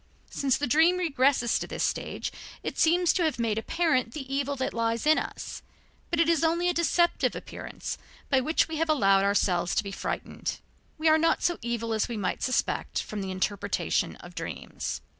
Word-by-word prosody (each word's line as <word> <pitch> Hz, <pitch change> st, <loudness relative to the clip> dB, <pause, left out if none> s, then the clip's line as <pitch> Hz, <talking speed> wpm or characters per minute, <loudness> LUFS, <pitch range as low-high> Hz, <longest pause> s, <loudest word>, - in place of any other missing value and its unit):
Since 270 Hz, -3 st, +1 dB
the 290 Hz, -, -1 dB
dream 320 Hz, +7 st, +4 dB
regresses 275 Hz, -7 st, +2 dB
to -, -, -4 dB
this -, -, -3 dB
stage, -, -, -2 dB, 0.3 s
it -, -, -3 dB
seems 345 Hz, +1 st, +4 dB
to 360 Hz, -, +1 dB
have 315 Hz, -5 st, +1 dB
made 225 Hz, -2 st, 0 dB
apparent 255 Hz, -2 st, +1 dB
the 270 Hz, -3 st, -6 dB
evil 280 Hz, 0 st, 0 dB
that 260 Hz, -1 st, -2 dB
lies 230 Hz, +1 st, 0 dB
in 310 Hz, +1 st, +5 dB
us. -, -, -6 dB, 0.5 s
But 340 Hz, -, 0 dB
it 335 Hz, -, +4 dB
is 330 Hz, -2 st, +3 dB
only 340 Hz, +2 st, +2 dB
a 355 Hz, -, +2 dB
deceptive 345 Hz, +1 st, +2 dB
appearance -, -, -6 dB, 0.3 s
by 265 Hz, -2 st, +3 dB
which 315 Hz, +5 st, +2 dB
we 320 Hz, -1 st, -4 dB
have 325 Hz, +1 st, 0 dB
allowed 195 Hz, -10 st, +4 dB
ourselves 185 Hz, -3 st, +1 dB
to -, -, +2 dB
be 200 Hz, -, -6 dB
frightened. -, -, -4 dB, 0.4 s
We 320 Hz, +1 st, 0 dB
are 315 Hz, 0 st, +6 dB
not 330 Hz, +1 st, +2 dB
so 345 Hz, -, +1 dB
evil 230 Hz, -1 st, -2 dB
as 220 Hz, -, +1 dB
we 235 Hz, -, -4 dB
might 205 Hz, -, -2 dB
suspect 255 Hz, -, 0 dB
from 210 Hz, -1 st, -5 dB
the 190 Hz, -, -4 dB
interpretation 190 Hz, +2 st, -1 dB
of -, -, -12 dB
dreams. -, -, -5 dB
275 Hz, 195 wpm, -28 LUFS, 230-325 Hz, 0.5 s, are